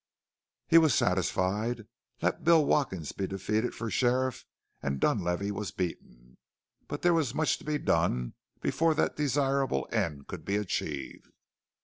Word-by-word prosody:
He 165 - +7
was 155 -6 +4
satisfied. 100 +5 0 0.4
Let - - 0
Bill 165 -2 +5
Watkins 95 - 0
be 95 - -3
defeated 105 +5 -1
for 115 -1 -4
sheriff 130 +1 +1 0.4
and 70 -1 -2
Dunlavey 90 +7 0
was 100 -1 -4
beaten. 65 -8 -6 0.5
But 145 - -5
there 175 0 +5
was 145 -6 +1
much 155 -4 +1
to - - -14
be 150 0 -1
done 60 - 0 0.3
before 165 -1 +2
that - - +1
desirable 140 -2 +1
end 85 -11 -1
could - - -8
be 100 - -1
achieved. 75 -9 -4
110 Hz, 140 wpm, -29 LUFS, 90-140 Hz, 0.5 s, He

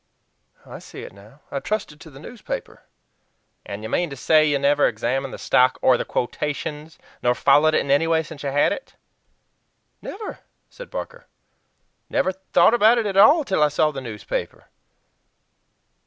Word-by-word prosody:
I - - -10
see - - -11
it - - -10
now. 105 +9 -18
I 140 - -2
trusted 195 -5 -4
to 160 - -12
the 135 - -15
newspaper." 205 - -8 0.8
"And 100 +2 -8
you 110 - -5
mean 175 +7 0
to 140 - -7
say 155 +5 +3
you 145 -2 +2
never 145 +1 +3
examined 125 +4 -2
the - - -7
stock 125 0 +2
or 130 - +5
the - - -3
quotations, 150 +4 -4 0.2
nor 125 0 +2
followed 145 +5 +4
it - - +3
in 140 - -3
any 145 +4 +3
way, 165 -1 +2
since 155 -2 -11
you 140 - -3
had 145 +2 +2
it?" - - -10 1.1
"Never!" 425 +2 -7 0.3
said - - -11
Barker. 485 0 -7 0.8
"Never 185 - +1
thought 190 +1 +2
about 235 0 +5
IT 230 - 0
AT 200 -2 -2
ALL 290 - +6
till 190 - -1
I 150 - +5
saw 155 +1 +1
the 135 -2 -6
newspaper. 110 -5 -6
150 Hz, 170 wpm, -22 LUFS, 135-190 Hz, 1.1 s, ALL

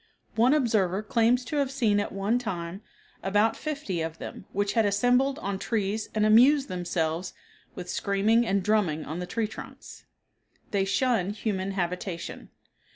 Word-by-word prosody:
One 245 +6 +4
observer 215 -8 +1
claims 235 +3 +2
to 295 - -3
have 280 -2 +1
seen 230 -7 +2
at 205 - -2
one 200 +5 0
time 185 -4 -5 0.4
about 205 +3 +2
fifty 285 - -3
of 160 0 -4
them - - -8
which 205 0 0
had 225 - +3
assembled 245 +7 +2
on 200 -9 -3
trees 215 -1 -1
and 215 0 +3
amused 265 +6 +5
themselves 175 -1 -2 0.4
with 180 -1 -7
screaming 200 +5 +2
and 200 -4 0
drumming 180 -7 +1
on 160 +4 -5
the 180 - -4
tree 225 +4 -1
trunks. 220 - -11 0.7
They 195 -2 +1
shun 200 -1 +1
human 195 -3 -2
habitation. 180 -1 -4
205 Hz, 155 wpm, -27 LUFS, 185-235 Hz, 0.7 s, amused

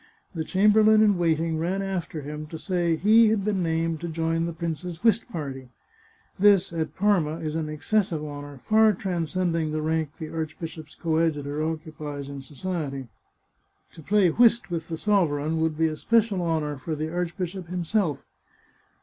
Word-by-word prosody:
The 160 -3 -2
chamber 210 +5 +4
lain 215 0 +6
in 205 -2 +4
waiting 165 -1 +1
ran 185 +4 -1
after 180 -5 -3
him 150 +2 -6
to 160 - -7
say 175 -2 0
he 220 +6 +5
had 210 -3 0
been 205 -3 0
named 165 -1 -1
to 170 - -3
join 165 0 -1
the - - -3
prince's 170 +2 -5
whist 230 +1 +3
party. 135 - -6 0.7
This, 195 -3 +4
at 160 -1 -3
Parma, 185 -6 +2
is 155 -2 -4
an 160 -1 -2
exces 185 +8 +1
sive 160 -4 -4
honour, 145 -2 -8
far 220 0 +5
transcending 170 -3 -1
the 155 0 -2
rank 160 -2 -1
the 160 -2 -7
archbishop's 160 -1 -6
co 160 -2 -1
adjutor 150 -2 -1
occupies 155 -3 -5
in 140 -1 -7
society. 140 -3 -5 0.8
To - - -12
play 195 +3 +3
whist 230 -2 +4
with 165 -1 -3
the 165 - -4
sover 175 -6 +2
eign 155 +3 -1
would 160 -1 0
be 160 - +3
a 155 -1 0
special 220 +1 +2
honour 155 -4 -1
for 155 +4 -4
the 155 +2 -4
archbishop 180 +1 -3
himself. 180 -2 -1
165 Hz, 175 wpm, -25 LUFS, 155-190 Hz, 0.8 s, lain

